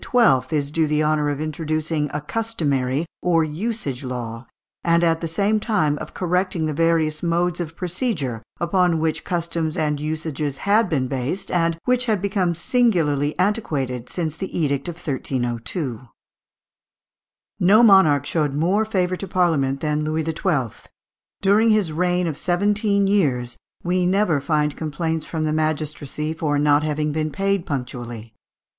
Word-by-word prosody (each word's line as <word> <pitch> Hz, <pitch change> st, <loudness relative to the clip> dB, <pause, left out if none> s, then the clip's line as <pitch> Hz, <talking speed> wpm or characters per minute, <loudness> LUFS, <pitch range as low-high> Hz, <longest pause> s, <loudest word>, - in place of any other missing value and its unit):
is 145 Hz, -2 st, -1 dB
due 160 Hz, 0 st, +1 dB
the 150 Hz, 0 st, +1 dB
honour 150 Hz, -1 st, +1 dB
of 145 Hz, -1 st, -2 dB
introducing 155 Hz, 0 st, -2 dB
a 150 Hz, -, -2 dB
customary 150 Hz, -, -1 dB, 0.2 s
or 165 Hz, -2 st, +3 dB
usage 155 Hz, -, -3 dB
law, 120 Hz, -2 st, -5 dB, 0.4 s
and 170 Hz, 0 st, +3 dB
at 165 Hz, -1 st, +2 dB
the 165 Hz, -, -2 dB
same 200 Hz, +6 st, +1 dB
time 200 Hz, -10 st, +1 dB
of -, -, -8 dB
correcting 180 Hz, -2 st, 0 dB
the 155 Hz, -, -1 dB
various 160 Hz, -1 st, +1 dB
modes 175 Hz, 0 st, 0 dB
of 165 Hz, -2 st, -4 dB
procedure, 175 Hz, -, -2 dB, 0.2 s
upon 175 Hz, -1 st, +2 dB
which 160 Hz, 0 st, -1 dB
customs 165 Hz, -2 st, -2 dB
and 150 Hz, -2 st, 0 dB
usages 155 Hz, -2 st, -3 dB
had 210 Hz, +1 st, +3 dB
been 135 Hz, -5 st, 0 dB
based, 135 Hz, +8 st, -3 dB
and 165 Hz, -1 st, +1 dB
which 250 Hz, 0 st, +1 dB
had 215 Hz, -3 st, +2 dB
become 190 Hz, -3 st, 0 dB
singularly 165 Hz, -, +1 dB
antiquated 140 Hz, -, -1 dB
since 160 Hz, -4 st, -3 dB
the 190 Hz, +3 st, -5 dB
edict 140 Hz, -3 st, 0 dB
of 175 Hz, -, -4 dB
1302. 130 Hz, -, -3 dB, 1.6 s
No 205 Hz, +6 st, +6 dB
monarch 165 Hz, -, +6 dB
showed 150 Hz, -4 st, 0 dB
more 180 Hz, +8 st, +2 dB
favour 185 Hz, -4 st, 0 dB
to 195 Hz, -, -6 dB
Parliament 155 Hz, -7 st, +1 dB
than 150 Hz, -1 st, 0 dB
Louis 155 Hz, +1 st, -1 dB
XII. 155 Hz, -, -2 dB, 0.5 s
During 210 Hz, +4 st, +4 dB
his 210 Hz, -7 st, +2 dB
reign 180 Hz, +2 st, +1 dB
of 155 Hz, -4 st, -3 dB
seventeen 200 Hz, +2 st, +1 dB
years 135 Hz, -12 st, +1 dB, 0.3 s
we 180 Hz, 0 st, +1 dB
never 185 Hz, -6 st, +2 dB
find 150 Hz, 0 st, 0 dB
complaints 160 Hz, +1 st, -3 dB
from 160 Hz, -2 st, -2 dB
the 155 Hz, 0 st, 0 dB
magistracy 155 Hz, -1 st, -2 dB
for 155 Hz, -2 st, -1 dB
not 145 Hz, 0 st, +4 dB
having 150 Hz, 0 st, -1 dB
been 155 Hz, +1 st, -1 dB
paid 195 Hz, +4 st, -1 dB
punctually. 120 Hz, -5 st, -5 dB
160 Hz, 150 wpm, -22 LUFS, 145-180 Hz, 1.6 s, No